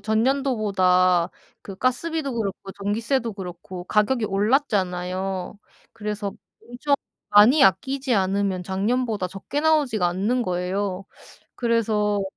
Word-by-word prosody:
전년도보다 205 Hz, -7 st, +2 dB, 0.3 s
그 195 Hz, -, -8 dB
가스비도 275 Hz, +3 st, -1 dB
그렇고 195 Hz, -3 st, -4 dB
전기세도 225 Hz, +4 st, -1 dB
그렇고 180 Hz, -1 st, -8 dB
가격이 215 Hz, +3 st, +1 dB
올랐잖아요. 195 Hz, -4 st, -1 dB, 0.4 s
그래서 210 Hz, -2 st, -4 dB, 0.4 s
엄청 250 Hz, +4 st, 0 dB, 0.4 s
많이 235 Hz, +8 st, +7 dB
아끼지 260 Hz, +8 st, +1 dB
않으면 195 Hz, -1 st, 0 dB
작년보다 205 Hz, +2 st, -1 dB
적게 195 Hz, +10 st, -4 dB
나오지가 290 Hz, -, +2 dB
않는 210 Hz, +8 st, 0 dB
거예요. 185 Hz, +1 st, -2 dB, 0.5 s
그래서 215 Hz, -3 st, +1 dB
210 Hz, 285 characters per minute, -23 LUFS, 190-245 Hz, 0.5 s, 많이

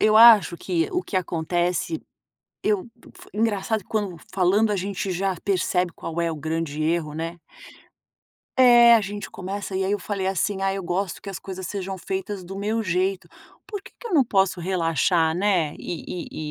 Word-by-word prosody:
eu 215 Hz, 0 st, +5 dB
acho 220 Hz, -6 st, +8 dB
que 170 Hz, -3 st, -1 dB
o 360 Hz, -, 0 dB
que 200 Hz, -, -4 dB
acontece, 175 Hz, -, -1 dB, 0.6 s
eu 210 Hz, +1 st, +1 dB, 0.3 s
f -, -, -14 dB
engraçado 210 Hz, -1 st, 0 dB
quando 205 Hz, -5 st, -2 dB, 0.2 s
falando 195 Hz, +4 st, +3 dB
a -, -, +1 dB
gente 195 Hz, 0 st, -3 dB
já 190 Hz, +1 st, -1 dB
percebe 180 Hz, -2 st, +1 dB
qual 165 Hz, +1 st, -5 dB
é 170 Hz, -1 st, 0 dB
o -, -, -4 dB
grande 155 Hz, 0 st, -3 dB
erro, 160 Hz, -1 st, 0 dB
né. 165 Hz, +2 st, -4 dB, 1.2 s
É, 240 Hz, -2 st, +8 dB
a 230 Hz, -, +5 dB
gente 205 Hz, 0 st, -5 dB
começa 195 Hz, +1 st, -5 dB
e 190 Hz, -, 0 dB
aí 190 Hz, +2 st, 0 dB
eu 205 Hz, -, +1 dB
falei 195 Hz, 0 st, -3 dB
assim: 195 Hz, +1 st, 0 dB
“Ah 195 Hz, 0 st, +1 dB
eu 195 Hz, -, -4 dB
gosto 180 Hz, +1 st, -2 dB
que 195 Hz, -, -6 dB
as 185 Hz, -, -5 dB
coisas 190 Hz, +1 st, -7 dB
sejam 195 Hz, 0 st, -4 dB
feitas 190 Hz, +1 st, -4 dB
do 185 Hz, +2 st, -8 dB
meu 215 Hz, +3 st, -1 dB
jeito”, 185 Hz, 0 st, 0 dB, 0.4 s
por 410 Hz, -2 st, -5 dB
que -, -, -15 dB
que 475 Hz, -, -8 dB
eu 405 Hz, -, -6 dB
não 290 Hz, -, +6 dB
posso 190 Hz, -4 st, +1 dB
relaxar 165 Hz, -2 st, +1 dB
né, 180 Hz, -5 st, +1 dB
e 165 Hz, -2 st, -6 dB
190 Hz, 180 wpm, -24 LUFS, 175-205 Hz, 1.2 s, acho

